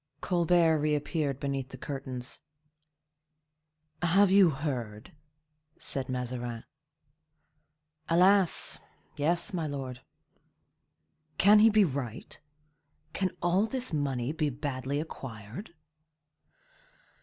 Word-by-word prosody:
Colbert 170 Hz, -2 st, +3 dB
reappeared 150 Hz, -1 st, -1 dB
beneath 135 Hz, -2 st, -3 dB
the 130 Hz, -, -9 dB
curtains. 130 Hz, -2 st, -6 dB, 1.6 s
"Have 185 Hz, +3 st, +4 dB
you 195 Hz, -3 st, +7 dB
heard?" 125 Hz, -8 st, -4 dB, 0.7 s
said 130 Hz, -2 st, -3 dB
Mazarin. 120 Hz, -2 st, -4 dB, 1.5 s
"Alas! 185 Hz, +2 st, +3 dB, 0.4 s
yes, 170 Hz, +5 st, +1 dB
my 165 Hz, -4 st, -1 dB
lord." 135 Hz, -3 st, -5 dB, 1.4 s
"Can 210 Hz, +3 st, +7 dB
he 220 Hz, +2 st, +7 dB
be 215 Hz, -2 st, +5 dB
right? 130 Hz, -, -6 dB, 0.7 s
Can 190 Hz, -1 st, 0 dB
all 185 Hz, +5 st, +2 dB
this 255 Hz, -4 st, 0 dB
money 135 Hz, -3 st, -1 dB
be 155 Hz, -1 st, -1 dB
badly 140 Hz, 0 st, -3 dB
acquired?" 130 Hz, -, -8 dB
145 Hz, 85 wpm, -29 LUFS, 130-175 Hz, 1.6 s, you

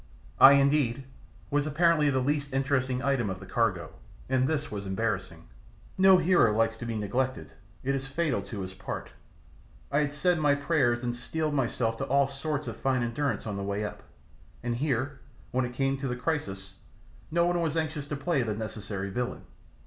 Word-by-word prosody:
I, 135 Hz, -, +10 dB
indeed, 140 Hz, -2 st, +3 dB, 0.5 s
was 145 Hz, +1 st, +1 dB
apparently 155 Hz, 0 st, +3 dB
the 135 Hz, -, +1 dB
least 145 Hz, +1 st, -1 dB
interesting 130 Hz, -1 st, 0 dB
item 135 Hz, -6 st, +1 dB
of 95 Hz, 0 st, -4 dB
the 95 Hz, -, -10 dB
cargo, 95 Hz, -7 st, 0 dB, 0.4 s
and 130 Hz, 0 st, +2 dB
this 150 Hz, -1 st, -1 dB
was 100 Hz, -2 st, -5 dB
embarrassing. 95 Hz, -5 st, -2 dB, 0.5 s
No 190 Hz, 0 st, +7 dB
hero 175 Hz, -10 st, +4 dB
likes 115 Hz, 0 st, +2 dB
to 120 Hz, -, -6 dB
be 115 Hz, -1 st, -2 dB
neglected, 130 Hz, +6 st, -2 dB, 0.3 s
it 135 Hz, +1 st, 0 dB
is 135 Hz, 0 st, -2 dB
fatal 150 Hz, -1 st, 0 dB
to 105 Hz, -5 st, -6 dB
his 95 Hz, 0 st, -6 dB
part. -, -, -6 dB, 0.8 s
I 140 Hz, -, +3 dB
had 145 Hz, -1 st, -1 dB
said 175 Hz, +3 st, +2 dB
my 145 Hz, -2 st, +4 dB
prayers 140 Hz, -5 st, +1 dB
and 120 Hz, 0 st, -1 dB
steeled 155 Hz, +5 st, -2 dB
myself 120 Hz, -4 st, 0 dB
to -, -, -2 dB
all 140 Hz, +1 st, +3 dB
sorts 145 Hz, +2 st, -3 dB
of -, -, -5 dB
fine 130 Hz, -2 st, +1 dB
endurance 135 Hz, +4 st, -1 dB
on 105 Hz, -2 st, -3 dB
the 100 Hz, -, -3 dB
way 100 Hz, +1 st, -2 dB
up, 105 Hz, -, -7 dB, 0.6 s
and 120 Hz, -1 st, -1 dB
here, 135 Hz, 0 st, -1 dB, 0.3 s
when 130 Hz, 0 st, +1 dB
it 125 Hz, -, -6 dB
came 135 Hz, +1 st, +1 dB
to 135 Hz, 0 st, -3 dB
the 125 Hz, -, -2 dB
crisis, 120 Hz, -9 st, -3 dB, 0.6 s
no 170 Hz, +2 st, +2 dB
one 175 Hz, 0 st, +1 dB
was 165 Hz, -1 st, -1 dB
anxious 155 Hz, -3 st, -2 dB
to 150 Hz, -, -3 dB
play 140 Hz, 0 st, 0 dB
the 110 Hz, -3 st, -1 dB
necessary 105 Hz, -2 st, -5 dB
villain. 125 Hz, +4 st, -3 dB
135 Hz, 185 wpm, -28 LUFS, 115-145 Hz, 0.8 s, I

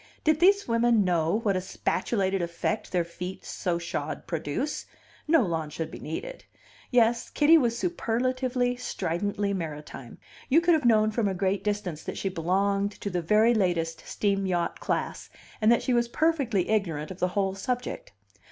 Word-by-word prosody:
Did 310 Hz, 0 st, +3 dB
these 400 Hz, +3 st, +4 dB
women 230 Hz, -2 st, +3 dB
know 175 Hz, +3 st, +1 dB
what 200 Hz, -4 st, +2 dB
a 185 Hz, -, 0 dB
spatulated 195 Hz, 0 st, -1 dB
effect 170 Hz, +5 st, -2 dB
their 180 Hz, -2 st, +2 dB
feet 180 Hz, +2 st, -7 dB
so 175 Hz, -2 st, -2 dB
shod 170 Hz, -4 st, -4 dB
produce, 165 Hz, -, -3 dB, 0.4 s
no 315 Hz, -3 st, +5 dB
law 165 Hz, -5 st, -2 dB
would 160 Hz, -, -3 dB
be -, -, -8 dB
needed. -, -, -6 dB, 0.5 s
Yes, 235 Hz, -1 st, +3 dB
Kitty 305 Hz, +2 st, +5 dB
was 240 Hz, -7 st, +3 dB
superlatively, 255 Hz, -4 st, 0 dB
stridently 205 Hz, -2 st, -2 dB
maritime; 150 Hz, -8 st, -6 dB, 0.3 s
you 300 Hz, -, +6 dB
could 340 Hz, 0 st, +3 dB
have 310 Hz, -5 st, +1 dB
known 215 Hz, -2 st, +4 dB
from 215 Hz, -1 st, 0 dB
a 190 Hz, -, -1 dB
great 190 Hz, +1 st, 0 dB
distance 205 Hz, -6 st, -2 dB
that -, -, -5 dB
she 195 Hz, -, -1 dB
belonged 195 Hz, +3 st, 0 dB
to 200 Hz, -, -5 dB
the 180 Hz, -1 st, -1 dB
very 215 Hz, +7 st, +4 dB
latest 170 Hz, -6 st, 0 dB
steam 195 Hz, -2 st, 0 dB
yacht 175 Hz, -2 st, -1 dB
class, -, -, -3 dB, 0.3 s
and 215 Hz, +1 st, +5 dB
that 235 Hz, -, +3 dB
she 255 Hz, -, +1 dB
was 240 Hz, 0 st, +2 dB
perfectly 260 Hz, -, +1 dB
ignorant 170 Hz, -7 st, -1 dB
of 185 Hz, -, -9 dB
the 180 Hz, -, +2 dB
whole 195 Hz, -1 st, +1 dB
subject. 245 Hz, -, -4 dB
200 Hz, 170 wpm, -27 LUFS, 175-240 Hz, 0.5 s, you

